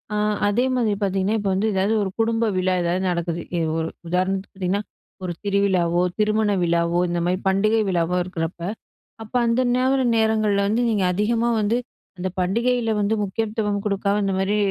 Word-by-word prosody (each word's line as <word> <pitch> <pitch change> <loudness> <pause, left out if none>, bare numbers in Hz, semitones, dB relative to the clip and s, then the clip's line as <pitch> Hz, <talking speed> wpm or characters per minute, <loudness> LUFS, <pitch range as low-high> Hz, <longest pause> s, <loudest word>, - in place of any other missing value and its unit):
அ - - 0 0.3
அதேமாரி 240 0 +1
பார்த்தீங்கன்னா, 195 +2 0
இப்ப 200 -1 -1
வந்து 200 +4 +1
எதாது 195 +2 +1
ஒரு 195 - -2
குடும்ப 225 0 +1
விழா 185 0 +1
எதாது 175 +2 0
நடக்குது. 170 -1 -2 0.2
எ - - +1 0.2
ஒரு 160 0 -1 0.2
உதாரணத்துக்கு 185 +3 -1
பார்த்தீங்கன்னா, 190 +2 -1 0.4
ஒரு 180 - -3
திருவிழாவோ, 190 -4 +2 0.2
திருமண 215 0 +2
விழாவோ, 170 0 +1
இந்த 175 0 -1
மாரி 180 +1 +1
பண்டிகை 215 +3 +3
விழாவோ 175 0 +1
இருக்குறப்ப, 170 -1 -5 0.6
அப்ப 220 +3 -12
அந்த 230 +2 +2
நோர 260 +2 +2 0.2
நேரங்கள்ல 215 -2 +2
வந்து 225 +4 +1
நீங்க 210 -4 +1
அதிகமா 230 +4 +1
வந்து, 215 +3 +1 0.4
அந்த 185 +1 -2
பண்டிகையில 230 +4 +1
வந்து 205 +2 +1
முக்கியத்துவம் 210 0 -2
குடுக்காம 200 +1 0
இந்த 195 -1 0
மாரி, 200 +2 +1
200 Hz, 160 wpm, -22 LUFS, 180-220 Hz, 0.6 s, பண்டிகை